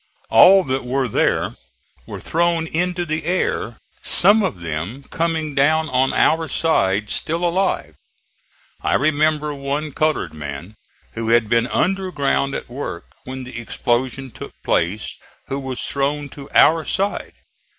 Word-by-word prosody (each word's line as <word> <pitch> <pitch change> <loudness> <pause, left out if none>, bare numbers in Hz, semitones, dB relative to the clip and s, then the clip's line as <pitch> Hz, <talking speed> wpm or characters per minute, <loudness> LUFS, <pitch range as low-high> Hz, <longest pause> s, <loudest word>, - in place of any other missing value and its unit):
All 195 +1 +8
that 130 -2 -2
were 130 +1 -1
there 105 - 0 0.5
were - - -7
thrown 170 0 0
into 175 +2 -1
the 155 0 -2
air, 180 +4 -1 0.2
some 215 +2 +5
of 100 - -2
them 85 - -5
coming 160 -2 -1
down 155 +3 +2
on 130 0 +2
our 160 0 +2
side, 105 -13 +1
still 165 +3 -1
alive. 175 - 0 0.9
I - - +1
remember 150 +1 +1
one 140 +2 -3
colored 155 - 0
man, 75 +5 -7 0.4
who 115 0 -4
had 115 -2 +3
been 120 +1 +2
under 190 +7 0
ground 140 -2 0
at - - -5
work 120 -9 -6 0.2
when 130 0 -6
the 125 -2 -7
explosion 125 +3 -2
took - - -9
place, 95 +6 -1 0.3
who 135 - -2
was 130 -2 -5
thrown 145 +1 -1
to 140 0 -11
our 160 +1 +5
side. 195 +5 -2
140 Hz, 140 wpm, -20 LUFS, 120-160 Hz, 0.9 s, All